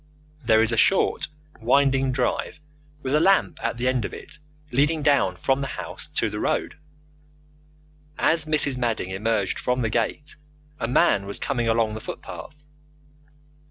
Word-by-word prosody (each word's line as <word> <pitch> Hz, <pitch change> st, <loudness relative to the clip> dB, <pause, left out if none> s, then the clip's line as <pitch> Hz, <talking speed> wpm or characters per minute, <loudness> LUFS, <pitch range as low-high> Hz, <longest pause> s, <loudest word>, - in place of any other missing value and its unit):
There 110 Hz, -1 st, +4 dB
is 115 Hz, -, +1 dB
a 115 Hz, -, -1 dB
short, 195 Hz, -, +3 dB, 0.3 s
winding 135 Hz, +2 st, +2 dB
drive 125 Hz, +2 st, -2 dB, 0.4 s
with 130 Hz, -, -2 dB
a 150 Hz, -, +4 dB
lamp 190 Hz, +4 st, +2 dB
at 115 Hz, 0 st, -2 dB
the 125 Hz, +1 st, -1 dB
end 130 Hz, -2 st, +1 dB
of -, -, -5 dB
it 150 Hz, -, -12 dB, 0.3 s
leading 145 Hz, +4 st, +1 dB
down 140 Hz, -11 st, +3 dB
from 135 Hz, +7 st, 0 dB
the 135 Hz, -, -2 dB
house -, -, -7 dB
to -, -, +1 dB
the -, -, -5 dB
road. -, -, -1 dB, 1.4 s
As 165 Hz, -1 st, +3 dB
Mrs. 150 Hz, -4 st, +3 dB
Madding 115 Hz, -6 st, -1 dB
emerged 105 Hz, 0 st, -1 dB
from 125 Hz, 0 st, -1 dB
the 115 Hz, -, -1 dB
gate 120 Hz, +6 st, -2 dB, 0.4 s
a 115 Hz, -, -2 dB
man 100 Hz, -5 st, +2 dB
was 100 Hz, -, -5 dB
coming 120 Hz, -4 st, -1 dB
along 115 Hz, -1 st, +1 dB
the 110 Hz, -, -6 dB
footpath. 155 Hz, -, -8 dB
125 Hz, 160 wpm, -24 LUFS, 115-140 Hz, 1.4 s, There